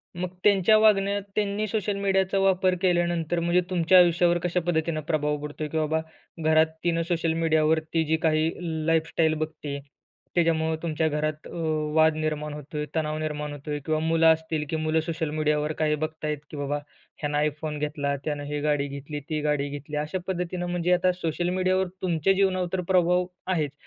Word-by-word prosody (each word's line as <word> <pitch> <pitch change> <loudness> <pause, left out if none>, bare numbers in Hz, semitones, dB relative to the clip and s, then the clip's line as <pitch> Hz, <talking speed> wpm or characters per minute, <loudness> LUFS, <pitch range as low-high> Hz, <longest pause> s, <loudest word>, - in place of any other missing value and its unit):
मग 180 +1 -3
त्यांच्या 205 +1 +5
वागण्यात, 200 -2 +3
त्यांनी 210 0 0
सोशल 210 -1 -1
मीडियाचा 195 -1 +1
वापर 185 -1 +3
केल्यानंतर 175 -2 +1
म्हणजे 170 +2 +2
तुमच्या 185 0 +4
आयुष्यावर 175 0 +4
कशा 180 0 +1
पद्धतीनं 160 -2 0
प्रभाव 150 -1 0
पडतोय 150 +1 -5
की 160 - -4
बाबा, 160 0 +1 0.5
घरात 160 0 +5 0.2
तिनं 170 -1 +1
सोशल 165 -1 +1
मीडियावरती 160 0 +1
जी 160 +1 +1
काही 155 0 +3 0.4
लाईफ 165 0 +2
स्टाईल 160 -1 +2
बघती, 155 -2 -4 0.6
त्याच्यामुळं 160 -2 +2
तुमच्या 160 -1 0
घरात 155 +1 -2
अ, - - -12 0.4
वाद 160 0 +5
निर्माण 155 -1 -2
होतोय, 150 +1 -5
तणाव 155 -1 -1
निर्माण 150 -1 -3
होतोय 145 +1 -5
किंवा 155 -1 +1
मुलं 165 +1 +3
असतील, 160 -1 -3
की - - -1
मुलं 155 0 +1
सोशल 160 -1 -3
मीडियावर 150 0 0
काही 150 -1 +2
बघतायत 155 0 -3
की 150 - -7
बाबा, 145 +1 -1 0.4
ह्यानं 145 0 -1
आयफोन 150 0 -1
घेतला, 145 -1 -1
त्यानं 145 -2 -2
ही 145 0 -3
गाडी 145 -1 +1
घेतली, 140 +2 -6
ती 155 -1 -1
गाडी 145 -1 0
घेतली. 145 +1 -7
अशा 150 +5 -2
पद्धतीनं 180 -1 -2
म्हणजे 175 0 +1
आता 180 +1 +3
सोशल 175 0 -2
मीडियावर 185 0 +1
तुमच्या 175 +1 +2
जीवनावर 185 -2 +1
तर 185 - 0
प्रभाव 180 0 +3 0.2
आहेच. 155 -6 0
160 Hz, 170 wpm, -26 LUFS, 150-180 Hz, 0.6 s, त्यांच्या